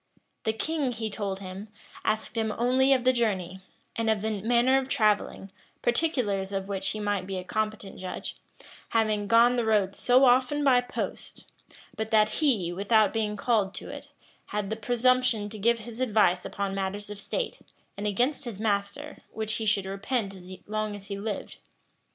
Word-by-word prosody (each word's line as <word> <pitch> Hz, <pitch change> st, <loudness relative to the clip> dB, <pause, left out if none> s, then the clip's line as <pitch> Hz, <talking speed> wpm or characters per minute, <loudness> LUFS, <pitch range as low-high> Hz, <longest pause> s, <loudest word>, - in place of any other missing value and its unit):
The 220 Hz, -, +2 dB
king, 285 Hz, +1 st, -1 dB
he 220 Hz, -2 st, -4 dB
told 200 Hz, -2 st, -3 dB
him, 190 Hz, +2 st, -7 dB, 0.4 s
asked 215 Hz, +2 st, -1 dB
him 220 Hz, -1 st, 0 dB
only 255 Hz, +3 st, +3 dB
of 260 Hz, -2 st, +4 dB
the 255 Hz, 0 st, +4 dB
journey, 190 Hz, -6 st, -1 dB, 0.4 s
and 225 Hz, -1 st, 0 dB
of 215 Hz, -2 st, +1 dB
the 215 Hz, -2 st, -1 dB
manner 245 Hz, +4 st, +4 dB
of 265 Hz, 0 st, -5 dB
travelling; 210 Hz, -4 st, +1 dB, 0.3 s
particulars 235 Hz, -8 st, +1 dB
of 195 Hz, -1 st, -3 dB
which 195 Hz, -1 st, -2 dB
he 215 Hz, -, -2 dB
might 205 Hz, -3 st, -1 dB
be 195 Hz, -1 st, -3 dB
a 180 Hz, -, -4 dB
competent 215 Hz, 0 st, -3 dB
judge, 185 Hz, -1 st, -5 dB, 0.5 s
having 215 Hz, -2 st, +1 dB
gone 235 Hz, +3 st, +5 dB
the 240 Hz, -, +2 dB
road 210 Hz, -3 st, +2 dB
so 255 Hz, +5 st, +4 dB
often 255 Hz, +4 st, +3 dB
by 255 Hz, -3 st, +5 dB
post; 245 Hz, -, -6 dB, 0.5 s
but 220 Hz, 0 st, -3 dB
that 215 Hz, -1 st, +4 dB
he, 210 Hz, -, +2 dB
without 205 Hz, +2 st, +3 dB
being 210 Hz, -2 st, -1 dB
called 205 Hz, -3 st, +1 dB
to -, -, -7 dB
it, -, -, -9 dB, 0.4 s
had 210 Hz, -1 st, -3 dB
the -, -, 0 dB
presumption 245 Hz, -1 st, +2 dB
to 215 Hz, 0 st, -8 dB
give 235 Hz, +3 st, +3 dB
his 230 Hz, +1 st, -9 dB
advice 210 Hz, -7 st, +3 dB
upon 195 Hz, 0 st, -3 dB
matters 195 Hz, +1 st, -3 dB
of 205 Hz, -, -7 dB
state, -, -, -3 dB, 0.4 s
and 205 Hz, +1 st, -3 dB
against 250 Hz, +8 st, 0 dB
his 225 Hz, -5 st, -6 dB
master, 210 Hz, +7 st, -2 dB
which 220 Hz, -1 st, -3 dB
he 220 Hz, -, -3 dB
should 205 Hz, -2 st, +2 dB
repent 200 Hz, +2 st, -2 dB
as 185 Hz, -1 st, -12 dB
long 215 Hz, 0 st, -2 dB
as 200 Hz, 0 st, -11 dB
he 200 Hz, 0 st, -4 dB
lived. 210 Hz, 0 st, -5 dB
215 Hz, 180 wpm, -27 LUFS, 200-240 Hz, 0.5 s, gone